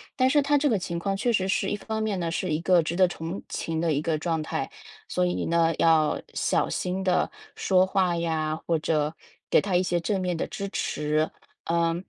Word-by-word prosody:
但 255 -1 +3
是 290 +2 +4
她 290 +1 +2
这 290 +1 +2
个 220 - +2
情 170 -1 -4
况 195 +3 -1
确 240 +4 +1
实 190 -3 +1
是， 195 0 0
一 - - 0
方 220 +1 -4
面 210 -3 -1
呢， 170 -1 -1
是 185 +2 -2
一 155 0 0
个 180 0 +4
值 160 +2 -3
得 185 0 +5
同情 165 -1 -4
的 170 -1 +1
一 145 - 0
个 160 0 0
状 160 0 -1
态， - - -3 0.4
所 90 - +1
以 90 0 -1
呢， 165 0 +2
要 160 -2 +3
小 - - +1
心 185 +1 -2
地 185 -1 +2 0.3
说 185 -1 +3
话 190 -2 +1
呀， 160 -2 -1
或 165 - +2
者 155 -1 0 0.4
给 - - +5
她 195 -2 -1
一 175 - +4
些 175 -1 0
正 190 +3 -1
面 180 -2 -1
的 - - -1
支 200 0 -5
持。 150 -4 0 0.4
呃， 165 0 +1
175 Hz, 240 characters per minute, -26 LUFS, 160-190 Hz, 0.4 s, 得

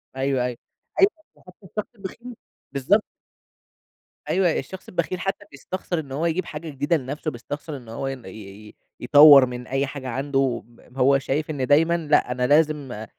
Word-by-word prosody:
أيوه، 135 -1 0
أيوه. 125 -2 -4 0.4
أيوه 390 - +7 0.3
ده - - -24
حتّى 180 - -16
الشخص 210 +5 -6
البخيل، 235 +5 -9 0.4
بالضبط. 140 +11 +2 1.3
أيوه. 185 -2 +3
الشخص 190 - -9
البخيل 180 +1 -2
حتّى 195 +2 -3
بيستخسر 175 +4 -4
إن 140 -4 -8
هو 145 +5 -2
يجيب 170 +2 0
حاجة 160 0 -7
جديدة 145 +3 0
لنفسه، 145 +3 -4
بيستخسر 145 +4 -7
إن 120 -4 -13
هو 115 +4 -4
ين 135 -3 -6
ي - - -8 0.4
ي - - -19 0.2
يطوَّر 145 +1 +8
من 125 0 -7
أي 135 +1 0
حاجة 135 -1 -7
عنده 135 -1 -1
ب 120 +2 -20
هو 135 +1 +4
شايِف 145 +3 -2
إن 135 -4 -2
دايمًا 165 +5 +4
لأ، 150 -6 +2
أنا 125 0 0
لازم 145 -6 +1
145 Hz, 175 wpm, -23 LUFS, 130-170 Hz, 1.3 s, يطوَّر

